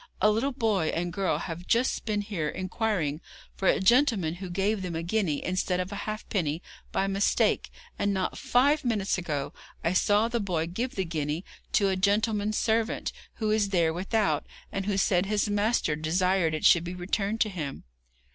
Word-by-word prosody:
A 210 +2 +5
little 230 +6 0
boy 220 - +1
and 175 +2 -2
girl 195 +1 0
have 175 +1 -6
just 240 +3 +1
been 210 -2 0
here 190 -8 -3
inquiring 185 -5 -1 0.3
for 195 - -1
a - - +4
gentleman 220 - +3
who 185 +1 -7
gave 195 +3 0
them 180 -3 -4
a 165 - -2
guinea 175 -5 0
instead 180 0 0
of 185 +2 -3
a - - -4
halfpenny 185 -7 -2 0.3
by 195 - +1
mistake 195 +1 +1 0.3
and 205 - +1
not 190 -2 -1
five 285 +5 +2
minutes 210 -6 0
ago 150 -5 -3 0.3
I 170 - +1
saw 205 +4 +3
the 235 0 -1
boy 175 -6 -1
give 230 +10 -3
the 190 - -1
guinea 155 +1 -3 0.3
to 200 -2 +4
a 190 - +1
gentleman's 210 +2 +1
servant, 225 0 0 0.2
who 215 -2 -1
is 215 -2 +2
there 170 -4 +2
without, 195 +4 0 0.2
and 195 0 -3
who 200 -2 0
said 190 -1 +2
his 210 0 0
master 205 -6 +1
desired 170 +1 +1
it 155 - -3
should 170 - +6
be 175 +1 -5
returned 200 +4 -1
to 215 - +3
him.' 155 -8 -5
195 Hz, 185 wpm, -28 LUFS, 175-215 Hz, 0.3 s, should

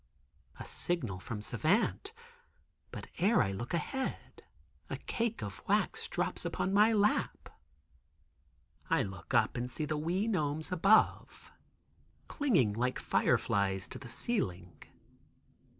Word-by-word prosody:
A - - -6
signal 120 - -1
from 105 +1 -6
Savant, 195 - +1 0.8
but - - -7
e'er 210 +6 +4
I 100 - -1
look 105 +5 -5
ahead, 265 - -4 0.5
a - - -3
cake 230 - -2
of 100 -2 -7
wax - - +1
drops - - -2
upon 190 - -1
my 210 +3 +6
lap. 210 -1 +1 1.4
I - - +3
look 95 -1 -6
up - - +3
and 125 +1 -2
see 155 +4 -3
the 150 0 -2
wee 175 +7 0
gnomes 155 -5 -1
above, 195 +5 +2 0.8
clinging 180 - +2
like 125 +4 -1
fireflies 95 -2 +1
to - - -8
the 120 - -10
ceiling. 90 - -3
155 Hz, 120 wpm, -32 LUFS, -, 1.4 s, my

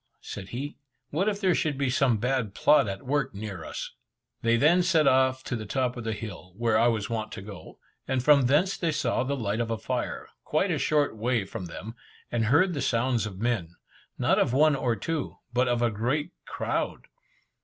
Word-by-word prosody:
said 95 -2 -7
he 140 +5 -5 0.3
"What 185 +8 +1
if 205 -1 -3
there 190 -3 +3
should 150 -4 0
be 135 -2 0
some 125 -3 +3
bad 125 -2 -1
plot 150 - +4
at 95 -1 -5
work 135 -2 0
near 100 -5 -6
us!" - - -6 0.5
They 115 0 +3
then 160 +8 +5
set 170 -4 +3
off 130 0 +3
to 125 - -3
the 110 -3 -5
top 125 +2 0
of 120 - -6
the 110 0 -2
hill, 95 -4 -8
where 115 -1 +1
I 115 +2 +5
was 110 -3 0
wont 110 -1 -3
to - - -6
go, 100 -6 -10 0.3
and 130 -2 0
from 140 -3 +5
thence 165 +9 +3
they 165 -2 0
saw 145 -5 0
the 140 +2 -2
light 110 -2 -1
of 115 -1 -1
a 115 - -1
fire, - - -3 0.2
quite - - +1
a - - 0
short 150 -5 +1
way 115 -1 0
from 95 0 -6
them, 105 +6 -8 0.4
and 115 -2 +1
heard 160 - +4
the 145 - -2
sounds 115 -2 +1
of 95 -3 -8
men, 100 -6 -1 0.4
not - - +2
of 120 - +2
one 150 +2 +5
or 125 -3 0
two, 155 +7 -3 0.2
but 125 +1 +2
of 120 -1 +1
a 120 - +2
great 135 +10 -1 0.2
crowd. - - -2
120 Hz, 210 wpm, -27 LUFS, 110-145 Hz, 0.5 s, then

